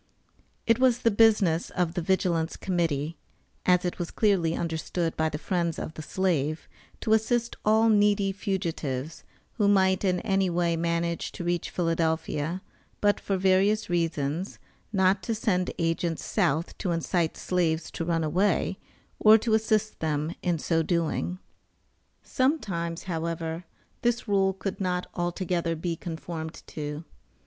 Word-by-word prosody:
It 230 0 +3
was 250 -1 +3
the 230 - +4
business 205 -6 +4
of 175 -2 -1
the 175 - -2
Vigilance 170 -2 0
Committee, 165 -4 -1 0.5
as 180 0 +4
it 175 - -3
was 175 - -3
clearly 185 -7 +2
understood 165 0 -2
by 160 0 +1
the 150 - -4
friends 170 -1 -1
of 160 - -5
the 155 - -7
Slave, 155 -3 -1 0.3
to 220 - +2
assist 235 +2 +1
all 220 +1 +4
needy 205 -2 +3
fugitives, 165 - -3 0.3
who 205 -3 +3
might 190 -1 +3
in 180 -2 +2
any 195 -2 +1
way 170 -1 +1
manage 170 0 -1
to - - -6
reach 175 -1 -1
Philadelphia, 165 0 -1 0.4
but, 205 0 +2
for 195 - -1
various 190 +2 +2
reasons, 165 0 -1 0.3
not 190 -1 +3
to 220 +5 -2
send 185 -4 0
agents 165 0 -1
South 155 +5 0
to 185 - -2
incite 170 0 0
slaves 170 -3 0
to - - -4
run 165 -1 0
away, 185 +4 +1 0.4
or 215 +1 +8
to 225 0 -1
assist 215 -1 +1
them 155 +1 -1
in 175 -2 0
so 165 +1 +1
doing. 170 +1 -1 0.9
Sometimes, 195 - -1
however, 165 -1 -3 0.4
this 240 0 0
rule 195 -2 +3
could 195 +1 -5
not 180 -1 0
altogether 175 -1 -1
be 165 +1 -2
conformed 160 -1 -6
to. 150 +1 -5
175 Hz, 140 wpm, -27 LUFS, 165-195 Hz, 0.9 s, or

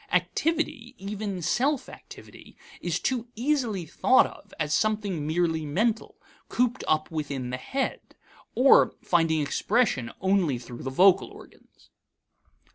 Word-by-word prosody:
Activity, 310 -7 -1
even 200 -2 -5
self 275 - 0
activity, - - -14 0.2
is 175 -1 -1
too 245 -2 -2
easily 235 - -1
thought 255 - +4
of - - -12
as 150 0 -1
something 205 -6 0
merely 160 0 0
mental, 215 +10 -1 0.3
cooped 250 +1 0
up 155 +1 +1
within 140 -5 -4
the 125 - -3
head, 265 - -4 0.4
or 265 +2 +5
finding 165 -3 +2
expression 150 - 0
only 190 -8 +1
through 120 0 -10
the 135 - -4
vocal 185 +7 +4
organs. - - -18
190 Hz, 120 wpm, -26 LUFS, 155-235 Hz, 0.4 s, or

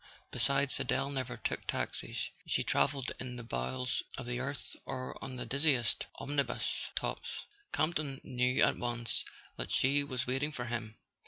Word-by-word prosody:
Besides, 135 +3 +3
Adele 140 - +1
never 130 -3 -2
took - - -2
taxis: - - -1 0.2
she - - +2
travelled 135 -2 +2
in 125 -1 -4
the 120 - -5
bowels 115 - -1 0.2
of 130 - -4
the 120 0 -1
earth 140 +2 -3
or 130 -1 -4
on 130 - -4
the 125 - -3
dizziest 140 -5 +3
omnibus 140 -1 0
tops. - - -2 0.3
Campton 155 -4 +1
knew 125 +1 +3
at - - +4
once 120 -1 +1 0.3
that - - -2
she 140 +2 +4
was 130 -3 -1
waiting 135 +4 +1
for 125 -4 -3
him. 115 -2 -3
130 Hz, 155 wpm, -34 LUFS, 120-140 Hz, 0.3 s, at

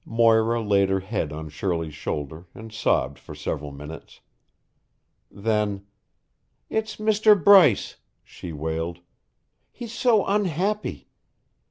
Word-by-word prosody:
Moira 115 0 +3
laid 100 -3 +2
her 95 0 0
head 95 -6 -3
on 80 +1 -6
Shirley's 80 0 -3
shoulder 80 +2 -5
and 110 0 -10
sobbed 110 - 0
for - - -11
several 75 0 -4
minutes. 75 +3 -11 1.1
Then, 105 -1 -1 0.9
"It's 220 0 -2
Mr. 215 0 +4
Bryce," 175 - +5 0.3
she 85 - -10
wailed. 80 +3 -4 0.7
"He's 235 -2 -9
so 225 -4 +2
unhappy. 200 +1 -1
105 Hz, 110 wpm, -24 LUFS, -, 1.1 s, Bryce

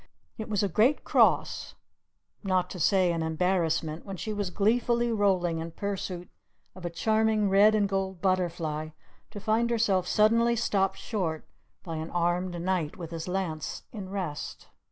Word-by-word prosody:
It 220 - -5
was 205 -2 +1
a - - +2
great 220 - +2
cross, - - +2 0.7
not 185 -2 0
to 180 - -6
say 185 +1 +3
an 165 -1 -1
embarrassment, 160 -1 0
when 195 -1 -7
she 215 +4 -4
was 205 -2 -2
gleefully 235 +5 +1
rolling 185 -6 +1
in 165 +1 -4
pursuit 180 -1 -4 0.5
of 185 - -12
a - - -1
charming 215 +3 +1
red 205 +2 +6
and 205 -2 +2
gold 190 -2 -2
butterfly, 170 -4 -1 0.4
to 205 - -8
find 220 +3 +1
herself 200 -6 +1
suddenly 230 +4 +3
stopped 195 -4 +1
short 170 -8 -3 0.4
by 165 -2 -5
an 160 +1 -5
armed 175 +1 0
knight 175 -3 -1
with 170 -3 -7
his 165 0 -5
lance 180 -5 -3
in 200 -5 -7
rest. 185 -7 -5
190 Hz, 155 wpm, -28 LUFS, 170-210 Hz, 0.7 s, red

